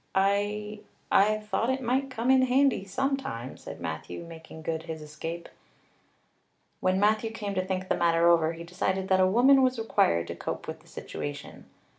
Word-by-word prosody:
"I 205 +2 0 0.3
I 215 +2 +4
thought 215 +2 -2
it 260 0 +1
might 265 +2 0
come 250 0 0
in 265 -1 +6
handy 260 -5 +3
sometime," 250 - -3
said - - -10
Matthew, 80 - -5
making 160 -1 -11
good 160 0 -2
his 160 -1 -4
escape. 160 +3 -7 1.3
When 185 +1 +1
Matthew 215 +2 +2
came 210 -3 -5
to 185 -1 0
think 185 0 -3
the - - +1
matter 170 -1 +3
over 165 -1 +4
he 165 0 -8
decided 185 +2 -2
that 190 0 +4
a 185 - +5
woman 260 +7 +5
was 255 -1 +2
required 85 - +2
to 85 - -4
cope - - -5
with - - -6
the - - -23
situation. 75 -2 -7
190 Hz, 175 wpm, -28 LUFS, 165-225 Hz, 1.3 s, in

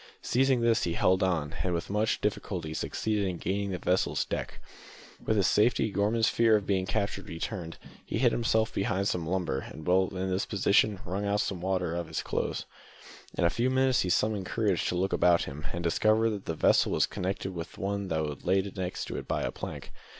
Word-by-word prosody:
Seizing 130 -1 +2
this, 115 -1 +3
he 85 - -1
held 90 +2 +2
on, 80 -5 0
and 90 -1 0
with 85 - -4
much 105 +2 +1
difficulty 90 -6 -2
succeeded 105 +4 -1
in 90 -2 -3
gaining 100 +3 -2
the 95 - -2
vessel's 90 +2 +1
deck. - - -4 0.6
With 110 - +1
his 100 - +3
safety 110 +2 +3
Gorman's 110 +3 +2
fear 115 -1 +4
of 105 -2 0
being 95 -2 0
captured 100 -2 -2
returned. 85 0 -5 0.3
He - - -3
hid 120 0 +4
himself 110 -1 +1
behind 100 -1 0
some 85 -5 -1
lumber, 85 -7 0
and 75 +3 -9
while 95 +1 +3
in 95 0 -2
this 95 +1 -1
position 100 0 +2
wrung 95 +4 -2
some 100 -2 -1
of - - -11
the 95 - -3
water 90 -3 0
out - - -1
of 85 - -5
his - - -3
clothes. - - -2 0.7
In - - +1
a 85 - +4
few 120 +6 +1
minutes 130 -1 +3
he 90 - -1
summoned 100 0 +1
courage 105 -6 0
to - - -1
look 95 +2 0
about 85 -1 +4
him, 75 +3 -7
and 85 0 -4
discovered 110 +6 +3
that 100 -2 -5
the 80 - -2
vessel - - +3
was - - +3
connected 95 +1 -3
with 85 0 -6
the - - -11
one 100 0 -2
that 80 -4 -2
lay 95 +2 +3 0.2
next 90 -2 -3
to - - -5
it - - -6
by - - -1
a - - -1
plank. - - -7
95 Hz, 215 wpm, -29 LUFS, 90-110 Hz, 0.7 s, fear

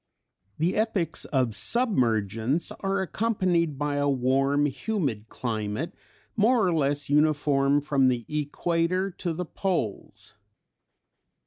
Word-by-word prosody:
The 170 +4 0
epochs 205 -7 0
of 130 -6 0
submergence 115 - +1
are 195 0 0
accompanied 180 -7 0
by 145 0 -1
a 145 0 +1
warm, 135 +2 +2
humid 140 - -2
climate, 115 - -3 0.4
more 225 +1 +3
or 180 - +2
less 145 -2 0
uniform 145 -1 +2
from 140 -2 +2
the 120 -3 0
equator 170 +5 -1
to 175 0 -4
the 180 +3 -3
poles. 170 - -3
145 Hz, 110 wpm, -26 LUFS, 130-180 Hz, 0.4 s, more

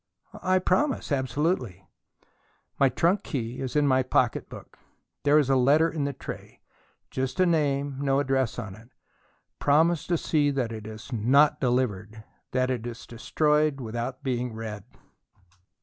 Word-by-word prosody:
"I 185 0 +2
promise, 185 - 0
absolutely." 130 - -1 0.9
"My 135 - +5
trunk 180 +8 +1
key 125 - -4
is 130 +1 -4
in 150 -1 +3
my 130 -2 +3
pocket 130 - 0
book. - - -12 0.4
There 145 +1 +4
is 150 -4 +3
a 135 - +3
letter 145 +6 +4
in 150 -3 -2
the 140 - -1
tray - - -9 0.5
just 130 +2 -3
a 185 - +5
name, 145 -4 0
no 135 -1 +1
address 135 -4 0
on 110 -5 -5
it. 110 +4 -15 0.7
Promise 160 +3 +3
to 175 - +1
see 150 -2 +1
that 130 -5 -1
it 110 -1 -7
is 110 +4 -9
not 130 +7 +4
delivered; 110 -4 -1 0.3
that 130 0 +1
it 120 -2 -3
is 115 -1 -8
destroyed 150 +4 +1
without 120 +3 -5
being 125 -3 -2
read." 110 -3 -6
135 Hz, 150 wpm, -26 LUFS, 120-150 Hz, 0.9 s, My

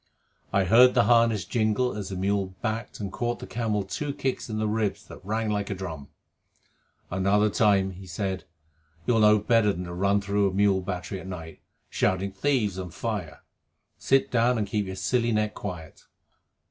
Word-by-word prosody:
I 100 - +3
heard 120 +7 +6
the 120 - +5
harness 115 -4 +3
jingle 110 +4 0
as 100 -3 -5
the 95 - -5
mule 95 0 -1
backed 115 0 -3
and 100 -3 -4
caught 120 0 -2
the - - -8
camel 110 -3 -1
two 140 +9 -4
kicks 130 -2 -2
in 110 - -3
the 110 0 0
ribs 105 -1 -1
that - - -12
rang 110 +2 -1
like 100 -1 -2
a 100 - -2
drum. 80 -7 -7 1.0
"Another 100 +3 +2
time," 100 -3 +3
he 95 0 -11
said, 95 0 -3 0.6
"you'll 120 -2 +3
know 105 0 +6
better 105 0 +3
than 90 -2 -5
to 85 -1 -7
run 100 +3 +2
through 100 0 +1
a - - -7
mule 100 -1 +3
battery 90 +1 -4
at 95 - -9
night, 85 -4 -8 0.3
shouting 95 +1 0
`Thieves 105 -3 0
and 90 -2 -6
fire!' 95 -10 -5 0.6
Sit 135 0 +2
down, 120 +1 +3
and 105 - 0
keep 105 0 -2
your 95 - -5
silly 120 +3 0
neck 105 -1 0
quiet." 85 -6 -8
100 Hz, 185 wpm, -26 LUFS, 95-115 Hz, 1.0 s, heard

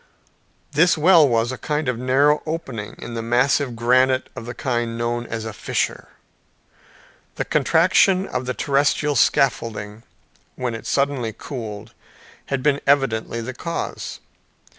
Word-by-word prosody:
This 160 +4 +4
well 160 -2 +6
was 115 +1 +1
a 130 - -6
kind 150 -1 -2
of 125 - 0
narrow 140 +4 +3
opening 135 -10 -5
in 120 - -8
the 115 - -3
massive 125 +2 +1
granite 130 +3 +2
of 115 - -8
the 120 - -6
kind 120 -3 -2
known 120 0 -2
as 110 -1 -5
a 110 - -5
fissure. - - -2 1.3
The - - -2
contraction 180 +5 +3
of 125 - -4
the 125 - -2
terrestrial 145 +1 +1
scaffolding, 110 -4 +1 0.5
when 125 -2 -3
it 115 - -7
suddenly 135 -5 0
cooled, 110 -6 -7 0.5
had 135 -2 -2
been 140 -1 +2
evidently 115 -5 +1
the 125 +3 -5
cause. 170 +7 -5
130 Hz, 140 wpm, -22 LUFS, 115-145 Hz, 1.3 s, well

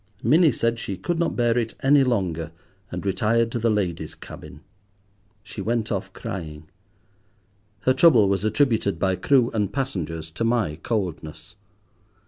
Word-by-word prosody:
Minnie 155 +6 +5
said 115 0 -1
she 100 -4 -4
could 165 - -2
not 170 - 0
bear 120 -1 +2
it 115 -2 -1
any 140 +1 +5
longer, 90 - -1 0.4
and 90 +2 -6
retired 110 +4 +1
to 120 - -2
the 115 +1 +1
ladies' 100 -6 -2
cabin. - - -11 0.8
She 110 -2 -8
went 115 +2 -1
off 95 -2 -3
crying. 80 -6 -7 1.1
Her 130 - +3
trouble 130 -7 +5
was 100 +1 0
attributed 110 - +1
by 95 +1 +1
crew 125 +5 +2
and 105 -3 0
passengers 80 - -3
to 85 - -4
my 115 -10 0
coldness. 90 -1 -4
110 Hz, 145 wpm, -24 LUFS, 95-120 Hz, 1.1 s, Minnie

